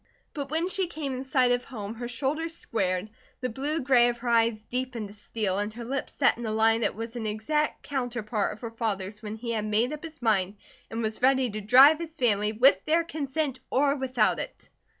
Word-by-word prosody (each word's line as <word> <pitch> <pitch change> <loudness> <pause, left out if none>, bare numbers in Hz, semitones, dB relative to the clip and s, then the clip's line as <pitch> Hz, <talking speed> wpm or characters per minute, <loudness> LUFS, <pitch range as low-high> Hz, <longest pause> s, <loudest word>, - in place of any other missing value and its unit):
But 280 -3 -5
when 325 +4 0
she 380 -1 0
came 300 -5 -4
in 255 +1 -4
sight 260 -2 +2
of 245 0 +1
home 215 -5 -6
her 240 +1 -6
shoulders 295 +7 -2
squared, 190 - -1 0.3
the 255 - -1
blue 290 +7 -2
gray 250 -2 +5
of 240 - -3
her 240 0 -4
eyes 230 -2 +3
deepened 245 -3 -4
to - - -12
steel, 210 -2 -2
and 205 +1 -2
her 235 0 -7
lips 270 +3 -3
set - - +3
in 240 - -4
a - - -1
line 225 +1 +3
that - - 0
was 225 +2 -6
an 225 -2 -3
exact 300 +9 -1
counterpart 240 -6 -2
of 210 - -14
her 230 -2 -5
father's 210 -2 -3
when 215 -1 -5
he 235 +1 -5
had 215 -2 -1
made 220 +6 +1
up 300 - -7
his 320 -1 -9
mind 205 -5 +1 0.3
and 225 +1 -3
was 220 +1 -3
ready 260 -2 +3
to 215 +1 -5
drive 265 +9 +7
his 330 -1 -6
family, 215 -6 +2
with 245 +6 +5
their 330 +2 +3
consent 295 -3 -2
or 280 +1 +3
without 255 -5 +1
it. - - -8
240 Hz, 220 wpm, -27 LUFS, 215-275 Hz, 0.3 s, drive